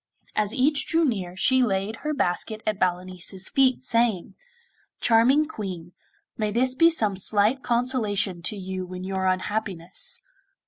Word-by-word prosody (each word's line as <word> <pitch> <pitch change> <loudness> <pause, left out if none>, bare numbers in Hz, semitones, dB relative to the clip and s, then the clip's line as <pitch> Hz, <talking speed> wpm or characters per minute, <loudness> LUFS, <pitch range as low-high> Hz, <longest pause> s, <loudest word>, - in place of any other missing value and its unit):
As 210 -1 +1
each 280 +4 +2
drew 330 0 +3
near 185 -8 -2
she 260 +6 +4
laid 205 -1 0
her 305 - -3
basket 215 -3 -1
at 215 -2 -1
Balanice's 185 +1 -3
feet, 260 -2 +2
saying: 230 -6 +1 0.7
'Charming 255 +7 +4
Queen, 185 - -6 0.4
may 215 -2 -1
this 250 +4 +1
be 330 +5 +5
some 215 -12 0
slight 210 +6 +2
consolation 225 -8 0
to 205 +5 -2
you 185 -1 -5
in 180 - -6
your 190 0 -2
unhappiness! 190 - -3
210 Hz, 140 wpm, -25 LUFS, 185-255 Hz, 0.7 s, be